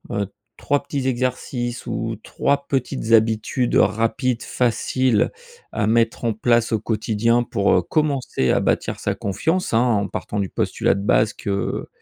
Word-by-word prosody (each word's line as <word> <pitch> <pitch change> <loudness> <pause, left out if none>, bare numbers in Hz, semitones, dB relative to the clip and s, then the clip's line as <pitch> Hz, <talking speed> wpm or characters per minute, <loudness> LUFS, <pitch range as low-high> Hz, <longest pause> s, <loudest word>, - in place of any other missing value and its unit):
heu, 100 -2 -1 0.3
3 145 0 0
petits 140 -2 -3
exercices 125 -1 -2
ou 115 0 -2
3 140 0 -1
petites 130 -3 -2
habitudes 115 +2 +2
rapides, 115 +3 +1
faciles 125 -1 +1 0.4
à 105 - -1
mettre 115 +1 +1
en 115 - +1
place 115 +2 +2
au 110 - +1
quotidien 110 +2 +1
pour, 100 -4 +1
heu, 90 - +4
commencer 140 - 0
à - - +3
bâtir - - -1
sa - - -1
confiance, 160 - -1
hein, 115 - +5
en 110 -5 +1
partant 105 - -4
du 100 -2 -1
postulat - - 0
de 100 - -3
base 105 +1 +3
que, - - -7
heu, 100 0 -2
115 Hz, 160 wpm, -21 LUFS, 110-125 Hz, 0.4 s, hein